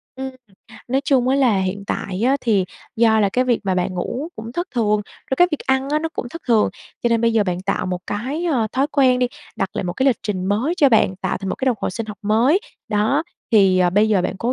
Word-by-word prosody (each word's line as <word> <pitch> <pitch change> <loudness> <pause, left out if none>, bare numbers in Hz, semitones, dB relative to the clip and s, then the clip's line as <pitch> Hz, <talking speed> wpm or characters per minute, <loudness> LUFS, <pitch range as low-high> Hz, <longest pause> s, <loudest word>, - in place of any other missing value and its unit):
Ừm, 265 0 -4 0.6
nói 265 +2 +1
chung 260 -2 +2
á 270 - +3
là 245 -7 +3
hiện 190 +1 -2
tại 195 +1 -3
á 265 +3 +3
thì 205 -5 +2 0.3
do 220 -1 +4
là 205 - +3
cái 250 +6 +1
việc 245 -2 +1
mà 190 -1 +1
bạn 180 0 -1
ngủ 245 - -3
cũng 225 +2 -7
thất 345 +6 -2
thường, 210 -3 +2 0.3
rồi 265 - +1
cái 355 0 +5
việc 305 - -1
ăn 265 +1 +1
á, 300 - +2
nó 325 - -2
cũng 320 - -5
thất 335 - -9
thường. 225 -3 +4 0.3
Cho 240 - +2
nên 230 -1 +2
bây 230 0 +2
giờ 220 -2 +3
bạn 180 -1 -2
tạo 185 - -2
một 180 -1 -3
cái, 265 +11 -3
ơ, 265 -10 +1
thói 270 +2 +1
quen 255 -3 +4
đi, 250 - +2 0.3
đặt 195 -1 -1
lại - - -2
một 175 - -2
cái 265 +6 0
lịch 250 -5 +3
trình 195 -3 -2
mới 230 - 0
cho 285 - +5
bạn, 220 -5 +3
tạo - - -2
thành 195 -1 -5
một - - -1
cái 265 - -4
đồng 250 -3 +2
hồ - - -1
sinh 225 +3 -5
học 210 -1 -8
mới. 235 - +3 0.3
Đó. 220 +8 +1 0.3
Thì, 195 -4 +5
ờ, 180 -1 +3
bây 205 +4 +3
giờ 200 -4 +2
bạn 185 +1 -2
cố 240 +2 0
225 Hz, 270 wpm, -20 LUFS, 200-265 Hz, 0.6 s, cái